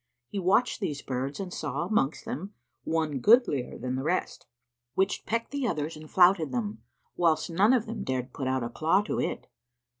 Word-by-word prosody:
He 200 - -3
watched 195 +7 +2
these 150 -8 -3
birds 135 +2 -3
and 185 -2 -5
saw, 150 +2 -2
amongst 165 -7 0
them, 195 +6 -5 0.3
one 160 -4 0
goodlier 215 - +4
than 125 0 -3
the 130 - -1
rest, 175 +6 -2 0.5
which 190 +1 0
pecked 230 +1 -1
the 280 -3 -1
others 155 -4 -2
and 155 0 -11
flouted 175 -5 +5
them, 110 -3 -3 0.3
whilst 170 -1 +2
none 195 +7 +4
of 245 -4 +3
them 225 +1 -5
dared 130 -1 -3
put 135 - -3
out 130 -1 0
a 120 - -3
claw 165 +10 +2
to - - -2
it. - - -2
160 Hz, 185 wpm, -28 LUFS, 135-195 Hz, 0.5 s, flouted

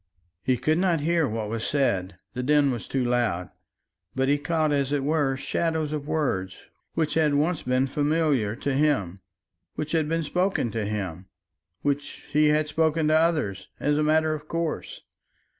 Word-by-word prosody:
He 130 +5 +1
could 155 +7 +1
not 175 -4 +2
hear 165 0 +2
what 110 -1 -3
was 110 +1 -3
said; 95 -10 0 0.2
the 125 - -3
din 145 +1 +3
was 120 -3 -5
too 135 -2 0
loud. 120 -8 0 0.6
But 130 +1 +1
he 145 +1 +3
caught, 155 0 0
as 140 -1 +1
it 145 -2 0
were, 145 -2 +1
shadows 160 +1 -1
of 150 -2 -4
words 130 -12 -1 0.4
which 155 -2 0
had 155 -3 +2
once 155 +3 +1
been 130 +1 +1
familiar 145 -6 +1
to 140 +3 -2
him, 130 - +1 0.6
which 155 0 -4
had 160 -2 +1
been 165 0 0
spoken 180 - 0
to 110 -1 -2
him, 95 -4 -4 0.6
which 145 0 -2
he 150 +1 +4
had 150 0 +2
spoken 160 0 +1
to 155 - +4
others 150 - +1
as 145 +1 +1
a 150 - +1
matter 155 +1 +3
of 150 0 -7
course. 165 -1 -3
145 Hz, 175 wpm, -26 LUFS, 125-155 Hz, 0.6 s, he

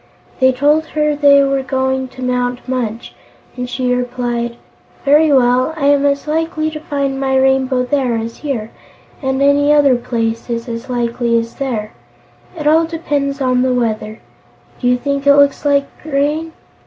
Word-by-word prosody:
They 260 -1 +5
told 295 +5 +1
her 300 -1 0
they 285 -1 +5
were 275 0 0
going 265 0 -1
to 260 0 -10
Mount 250 0 -2
Munch, 240 -3 -3 0.4
and 250 0 -5
she 250 0 -1
replied: 245 -1 -2 0.5
"Very 300 +2 +4
well; 255 +3 +3
I 280 - -1
am 285 0 +3
as 280 +1 -1
likely 315 0 -1
to 310 - -6
find 280 -3 -2
my 265 -1 +1
Rainbow 265 -1 +2
there 255 -2 0
as 225 +1 -5
here, 240 -7 -4 0.5
and 265 0 0
any 285 +1 +3
other 290 -3 +5
place 230 -1 -3
is 230 0 -3
as 235 +2 -6
likely 235 -1 0
as 230 0 -3
there. 230 -6 -4 0.6
It 300 - -5
all 320 +2 +4
depends 290 -4 -2
on 255 -1 +2
the 255 0 +1
weather. 220 -2 -2 0.6
Do 245 - -1
you 250 0 +3
think 280 +2 -2
it 280 - +7
looks 285 0 +3
like 280 -1 +3 0.2
rain?" 305 +2 -1
265 Hz, 165 wpm, -16 LUFS, 245-285 Hz, 0.6 s, it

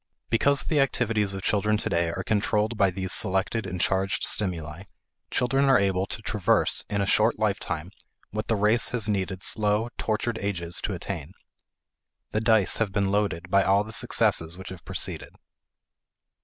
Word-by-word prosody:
Because 140 +5 +2
the 155 - 0
activities 110 -7 +1
of 95 - -6
children 105 +1 +1
today 85 -4 0
are 95 +3 -4
controlled 105 +2 0
by 100 -3 +3
these 95 0 -2
selected 95 +3 +2
and 90 -1 -5
charged 95 +2 0
stimuli, 85 -3 -2 0.4
children 135 +3 +1
are 135 -2 +5
able 95 -1 0
to 110 - -6
traverse 105 -4 +1
in 100 -1 -1
a - - +1
short - - +2
lifetime 85 +1 -2 0.4
what 110 +1 -4
the 115 - +1
race 105 +2 +2
has 115 -4 -1
needed 95 -2 -2
slow, 105 +1 +1
tortured 110 +1 -1
ages 85 -4 -2
to - - -3
attain. 75 +7 -6 1.0
The 110 - -1
dice 110 -4 +4
have 110 -3 0
been 100 0 0
loaded 95 -4 -1
by 100 - +5
all 100 +1 +3
the 110 - -10
successes 80 -5 +1
which 95 - -9
have 95 -2 -10
preceded. - - -3
100 Hz, 165 wpm, -26 LUFS, 95-110 Hz, 1.0 s, are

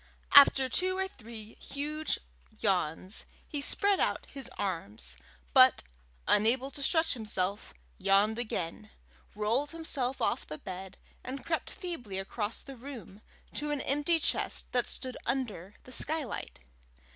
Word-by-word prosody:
After 275 -2 +8
two 370 +8 +1
or 380 0 0
three 225 - -10
huge 300 +2 -2 0.4
yawns, 185 0 0 0.2
he 290 -3 -3
spread 400 +7 +3
out - - 0
his 270 -2 -4
arms, 105 - -3 0.4
but, - - +7 0.4
unable 245 +6 +3
to 280 - -4
stretch 320 +3 +3
himself, 205 -4 -2 0.3
yawned 210 +3 +3
again, 180 -8 -3 0.5
rolled 230 +8 +1
himself 280 -6 0
off 250 - 0
the 155 - -6
bed, 190 +1 -8 0.3
and 265 +2 -6
crept 330 -1 -1
feebly 250 - -5
across 205 +3 -3
the 275 - -9
room 235 -6 -10 0.3
to 295 0 -1
an 295 -2 -1
empty 295 +5 +3
chest 315 - 0
that 245 -1 +2
stood 255 -1 -2
under 210 -8 -2
the 255 - -13
skylight. 290 - -1
250 Hz, 135 wpm, -31 LUFS, 200-285 Hz, 0.5 s, After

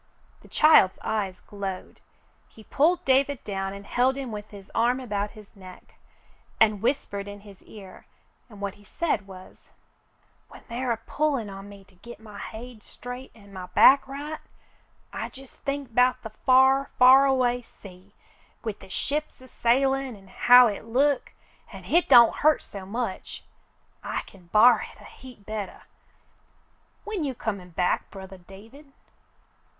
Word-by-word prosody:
The - - -17
child's 305 -12 +5
eyes 200 -4 -3
glowed. 195 -2 -7 0.5
He 220 - -16
pulled 320 +10 +1
David 270 0 +2
down 195 -1 -4
and 200 0 -10
held 255 +4 +1
him 265 -4 -5
with 210 0 -7
his 200 -2 -13
arm 245 +3 +1
about 210 -5 -3
his 210 0 -15
neck, 185 -2 -14 0.7
and 215 -3 +3
whispered 205 -5 -2
in 205 0 -9
his 200 -2 -15
ear, 195 -3 -14 0.4
and 205 -3 -13
what 200 -1 -3
he 205 - -20
said 205 -5 -2
was: 185 -1 -14 0.4
— - - -40
"When - - -15
they're 245 +1 -3
a 230 - 0
pullin' 265 -2 -2
on 195 +1 -10
me 200 -1 -13
to 195 - -26
git 235 +6 -13
my 210 -2 -12
hade 235 0 -9
straight 245 +4 -10
an' 200 -3 -17
my 185 -1 -7
back 270 +7 +5
right, 290 +3 -6 0.7
I - - -4
jes' 270 -1 -14
think 275 -4 -5
'bout 250 +1 +2
the 220 - -7
far 265 +4 +3
— - - -37
far 260 +2 +7
away 250 -2 +1
sea, 195 -3 -16 0.5
with 220 -3 -5
the 195 - -14
ships 300 +9 -3
a 260 - -15
sailin' 265 +1 0
an' 195 -2 -18
how 245 +4 +7
hit 210 0 -5
look, 270 +5 +1 0.4
an' - - -11
hit 345 +1 +1
don't 240 -3 +7
hurt 310 +1 +3
so 195 -2 -10
much. 225 -2 -5 0.6
I - - -3
kin 180 -3 -18
b'ar 225 +4 +6
hit - - -10
a - - -15
heap 250 -6 -14
bettah. 215 -2 -6 1.2
When 420 -6 -4
you 270 -3 -3
comin' 200 -6 -5
back, 180 +1 -1
brothah 190 -2 -12
David 230 +9 -15
225 Hz, 165 wpm, -25 LUFS, 200-265 Hz, 1.2 s, far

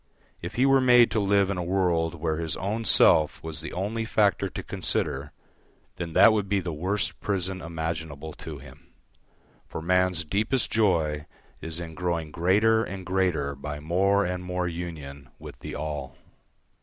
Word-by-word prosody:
If 85 - -6
he 125 - +3
were 135 -1 +5
made 125 -2 +6
to 110 - +1
live 100 -1 +2
in 95 - -2
a - - -2
world 85 -2 +1
where 80 -1 -2
his 80 -1 -2
own 110 +4 -3
self 80 -5 +4
was 80 -2 -3
the - - -6
only 105 +5 -2
factor 100 -3 +1
to - - -6
consider, 70 +2 -2 0.7
then 85 -2 -5
that 100 +5 +7
would 105 -3 -1
be 100 -1 +2
the 90 -3 -4
worst 95 +7 -2
prison 95 -2 -2
imaginable 80 -2 -5
to - - -8
him, - - -15 0.7
for - - -6
man's 90 0 +1
deepest 110 - 0
joy 80 -9 +1 0.3
is 80 +1 -3
in 85 -2 -7
growing 85 -2 -2
greater 105 +7 +3
and 95 -2 -6
greater 90 -7 0
by 75 +1 -6
more 95 +6 +2
and 90 0 -3
more 90 0 -2
union 75 -6 -7
with - - -11
the - - -7
all. 75 -3 -5
90 Hz, 170 wpm, -26 LUFS, 80-100 Hz, 0.7 s, that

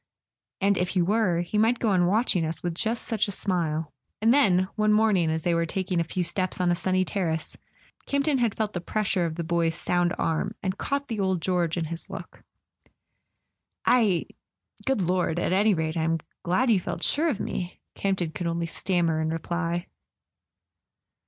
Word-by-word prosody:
"And 200 0 +2
if 180 0 0
he 185 - +1
were, 190 -3 +2
he 190 +4 -1
might 230 +3 +3
go 230 - 0
on 180 -3 +3
watching 205 -3 +2
us 160 +1 -3
with 175 -1 -1
just 225 +6 -1
such 220 -3 0
a - - -3
smile." 165 -6 -1 0.3
And 225 +3 +4
then, 185 -10 +4
one 215 -1 +2
morning 210 -6 +3
as 160 0 -1
they 175 - +2
were 170 0 +1
taking 185 0 -1
a - - +2
few 175 +2 -2
steps 185 +2 -2
on 180 -1 +2
a - - +3
sunny 185 +1 +1
terrace, 165 -5 -2 0.5
Campton 280 0 +1
had 235 -4 +1
felt 215 -1 -2
the 175 - -3
pres¬ 215 +4 -2
sure 180 -3 +1
of 160 - -5
the 170 - -3
boy's 165 0 +1
sound 175 0 0
arm, 160 -1 -1
and 190 0 -2
caught 280 0 -1
the 225 -4 -3
old 190 -2 +1
George 175 -1 0
in 165 - -1
his 165 +4 -6
look. 195 -2 -9 1.4
"I... 215 -9 +3 0.6
good 265 -8 +2
Lord... 180 -1 0
at 175 - 0
any 205 +1 +4
rate 160 0 -2
I'm 165 0 +1 0.2
glad 230 +8 +2
you 205 - +4
felt - - -4
sure 320 +3 +2
of 230 -9 -2
me," 180 -3 -4
Campton 190 -4 -1
could 175 +1 -4
only 170 0 -1
stammer 170 -2 0
in 160 - 0
reply. 170 +2 -2
180 Hz, 190 wpm, -26 LUFS, 170-210 Hz, 1.4 s, And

